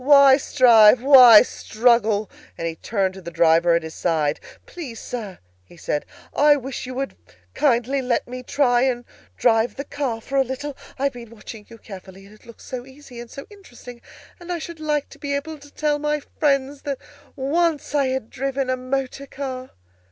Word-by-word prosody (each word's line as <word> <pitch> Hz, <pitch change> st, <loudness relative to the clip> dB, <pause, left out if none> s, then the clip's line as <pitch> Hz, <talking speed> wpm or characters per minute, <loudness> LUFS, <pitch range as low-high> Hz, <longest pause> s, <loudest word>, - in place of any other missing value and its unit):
"Why 280 Hz, -1 st, +7 dB
strive? 235 Hz, -4 st, +5 dB
why 255 Hz, -6 st, +9 dB
struggle?" 220 Hz, -3 st, +1 dB, 0.3 s
and 165 Hz, -, -3 dB
he 165 Hz, -, -4 dB
turned 195 Hz, +1 st, -2 dB
to 190 Hz, -, -11 dB
the 170 Hz, -, -7 dB
driver 170 Hz, 0 st, +3 dB
at 170 Hz, -, 0 dB
his 160 Hz, 0 st, -8 dB
side. 155 Hz, -4 st, -1 dB, 0.3 s
"Please, 270 Hz, -10 st, -9 dB
Sir," 215 Hz, -6 st, -7 dB, 0.3 s
he 170 Hz, -, -19 dB
said, 150 Hz, -2 st, -3 dB, 0.3 s
"I 295 Hz, 0 st, +5 dB
wish 265 Hz, -2 st, -6 dB
you 255 Hz, -, -7 dB
would 270 Hz, +1 st, -4 dB, 0.4 s
kindly 265 Hz, -1 st, +1 dB
let 250 Hz, -2 st, -1 dB
me 250 Hz, +1 st, -7 dB
try 245 Hz, -1 st, +1 dB
and 245 Hz, -2 st, -1 dB, 0.3 s
drive 225 Hz, -, +2 dB
the 280 Hz, -, -5 dB
car 275 Hz, -6 st, -4 dB
for 275 Hz, +4 st, -4 dB
a 270 Hz, -, +4 dB
little. 265 Hz, +3 st, -6 dB, 0.2 s
I've 275 Hz, +1 st, -1 dB
been 235 Hz, -2 st, -11 dB
watching 220 Hz, -1 st, -12 dB
you 230 Hz, -, -13 dB
carefully, 195 Hz, -2 st, -12 dB
and 200 Hz, -, -16 dB
it 215 Hz, -, -21 dB
looks 235 Hz, -, -14 dB
so 250 Hz, -1 st, -6 dB
easy 265 Hz, -2 st, -14 dB
and 240 Hz, 0 st, -9 dB
so 275 Hz, -, -10 dB
interesting, 245 Hz, -11 st, -13 dB, 0.4 s
and 350 Hz, 0 st, -8 dB
I 350 Hz, -, -1 dB
should 335 Hz, 0 st, -8 dB
like 300 Hz, -2 st, -1 dB
to 280 Hz, -, -15 dB
be 285 Hz, -1 st, -3 dB
able 305 Hz, +2 st, -5 dB
to 290 Hz, 0 st, -16 dB
tell 295 Hz, 0 st, -1 dB
my 300 Hz, 0 st, -1 dB, 0.2 s
friends 275 Hz, -1 st, 0 dB
that 280 Hz, -2 st, -4 dB, 0.4 s
once 295 Hz, +2 st, -1 dB
I 280 Hz, -2 st, +2 dB
had 260 Hz, -3 st, -4 dB
driven 270 Hz, 0 st, -2 dB
a 255 Hz, -, -1 dB
motor 270 Hz, +1 st, -4 dB
car!" 260 Hz, -2 st, -6 dB
255 Hz, 190 wpm, -22 LUFS, 225-280 Hz, 0.4 s, why